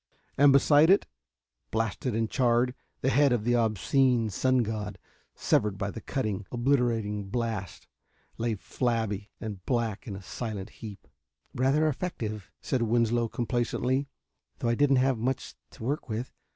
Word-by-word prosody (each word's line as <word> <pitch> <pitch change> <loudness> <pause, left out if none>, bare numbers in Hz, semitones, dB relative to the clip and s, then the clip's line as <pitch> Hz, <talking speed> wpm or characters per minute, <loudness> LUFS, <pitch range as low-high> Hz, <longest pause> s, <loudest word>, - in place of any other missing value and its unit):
And 145 +1 +6
beside 145 +3 +6
it, 195 - +5 0.6
blasted 115 +2 -1
and 115 0 +1
charred, 125 +1 +2 0.3
the 135 - +2
head 140 +2 +4
of 120 -3 +1
the 120 +2 +2
obscene 115 +1 +2
sun 130 +3 +2
god, 105 -2 -4 0.4
severed 105 -2 +1
by 100 0 -2
the 115 - -8
cutting, 105 -8 -3
obliterating 120 -5 +1
blast, 110 - -3 0.5
lay 115 -1 0
flabby 110 -2 -2
and 105 -4 -6
black 115 -4 -1
in 100 - -4
a 95 - -9
silent 105 -1 -5
heap. 105 -3 -10 0.5
"Rather 135 +5 +2
effective," 110 - -3
said 130 - 0
Winslow 115 0 +2
complacently, 125 +3 -1 0.5
"though 120 - -1
I - - +3
didn't 140 +2 +3
have 130 -2 +2
much 130 +3 -2 0.2
to - - -12
work 140 +2 -2
with. 115 +3 -4
115 Hz, 145 wpm, -28 LUFS, 110-130 Hz, 0.6 s, And